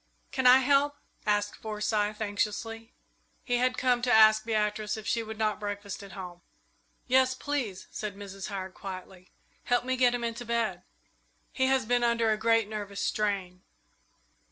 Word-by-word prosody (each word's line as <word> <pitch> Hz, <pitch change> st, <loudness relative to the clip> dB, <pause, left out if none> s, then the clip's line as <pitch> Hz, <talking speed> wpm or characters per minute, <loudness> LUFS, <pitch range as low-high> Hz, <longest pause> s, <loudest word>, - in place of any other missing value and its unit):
"Can 260 Hz, -2 st, +2 dB
I 250 Hz, +1 st, +9 dB
help?" 285 Hz, +2 st, +3 dB, 0.3 s
asked 205 Hz, 0 st, +1 dB
Forsyth, 210 Hz, 0 st, -2 dB
anxiously. 220 Hz, +2 st, -3 dB, 0.5 s
He 245 Hz, -1 st, 0 dB
had 255 Hz, +1 st, +1 dB
come 250 Hz, -2 st, +2 dB
to 245 Hz, 0 st, +1 dB
ask 215 Hz, -1 st, +7 dB
Beatrice 215 Hz, -1 st, -1 dB
if 215 Hz, -, -8 dB
she 230 Hz, -, 0 dB
would 220 Hz, -1 st, -7 dB
not 215 Hz, -1 st, 0 dB
breakfast 205 Hz, -1 st, -5 dB
at 200 Hz, -1 st, -11 dB
home. 180 Hz, -2 st, -8 dB, 0.6 s
"Yes, 260 Hz, 0 st, +3 dB
please," 255 Hz, -9 st, -3 dB
said 210 Hz, -2 st, -5 dB
Mrs. 195 Hz, -1 st, -7 dB
Howard, 190 Hz, -2 st, -5 dB
quietly. 185 Hz, -1 st, -9 dB, 0.4 s
"Help 245 Hz, 0 st, +1 dB
me 260 Hz, 0 st, 0 dB
get 250 Hz, -1 st, +3 dB
him 240 Hz, -, -4 dB
into 230 Hz, +1 st, -3 dB
bed. 230 Hz, -6 st, -1 dB, 0.7 s
He 260 Hz, 0 st, +1 dB
has 265 Hz, -3 st, +2 dB
been 245 Hz, +1 st, +2 dB
under 235 Hz, -1 st, +2 dB
a 215 Hz, -, +1 dB
great 225 Hz, -1 st, +2 dB
nervous 205 Hz, -2 st, -5 dB
strain." 195 Hz, -4 st, -1 dB
220 Hz, 160 wpm, -29 LUFS, 205-245 Hz, 0.7 s, I